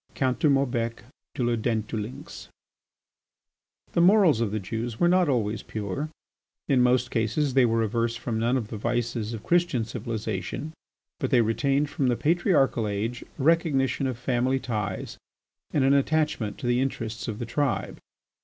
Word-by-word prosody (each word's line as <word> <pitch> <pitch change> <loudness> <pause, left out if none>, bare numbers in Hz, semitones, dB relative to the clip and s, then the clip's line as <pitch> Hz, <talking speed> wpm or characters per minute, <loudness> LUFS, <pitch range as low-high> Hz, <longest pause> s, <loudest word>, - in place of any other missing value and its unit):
COUNT 130 -2 0
DE 150 - +3
MAUBEC 120 -4 0 0.3
DE 125 - -1
LA 120 0 +2
DENTDULYNX 110 0 -4 1.5
The 170 - +3
morals 180 - +5
of 115 - +1
the 110 +2 -2
Jews 115 +3 -4
were 175 - +4
not 180 -2 +3
always 110 -5 0
pure; 110 +8 -4 0.6
in 135 -4 +3
most 125 0 +2
cases 125 +5 0
they 130 -2 +5
were 115 0 +1
averse 115 +1 0
from 115 -1 -3
none 120 +3 +2
of 110 -4 -4
the 110 - -5
vices 120 0 -2
of 115 -2 -6
Christian 170 -10 +2
civilization, 110 - -4 0.5
but - - -1
they 125 -4 +5
retained 140 +6 +1
from 135 - 0
the 120 - +2
Patriarchal 150 - +2
age 105 +4 -3
a 135 - -3
recognition 145 -4 +2
of 130 -3 -3
family, 130 +1 0
ties 105 -6 -4 0.5
and 145 - +1
an 135 +1 +4
attachment 140 -7 +1
to 135 - -7
the 120 +1 +2
interests 115 -4 -3
of 110 -3 -3
the 120 - -4
tribe. 135 +2 -1
120 Hz, 165 wpm, -26 LUFS, 115-140 Hz, 1.5 s, morals